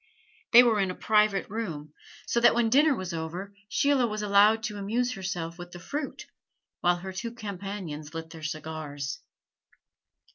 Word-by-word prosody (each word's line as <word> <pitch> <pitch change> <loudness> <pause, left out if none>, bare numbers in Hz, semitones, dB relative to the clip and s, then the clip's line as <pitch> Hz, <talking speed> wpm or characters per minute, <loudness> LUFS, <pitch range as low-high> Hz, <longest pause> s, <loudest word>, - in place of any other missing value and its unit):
They 245 +1 +10
were 225 -3 +3
in 195 -1 +1
a 185 - -4
private 210 -2 +2
room; 165 -9 -5 0.3
so 235 - +1
that 235 - +5
when 235 -2 +2
dinner 290 +2 +5
was 185 -4 -5
over, 170 +5 -5 0.2
Sheila 280 -1 +3
was 215 -1 -3
allowed 210 +2 +5
to 210 -2 -4
amuse 235 +5 0
herself 175 -5 -4
with 175 0 -9
the 175 - -8
fruit, 285 - -5 0.5
while 175 0 +3
her 190 +2 -7
two 230 +6 -4
companions 195 -8 -6
lit 165 0 -6
their 160 - -10
cigars. 155 -2 -5
195 Hz, 160 wpm, -28 LUFS, 165-225 Hz, 0.5 s, They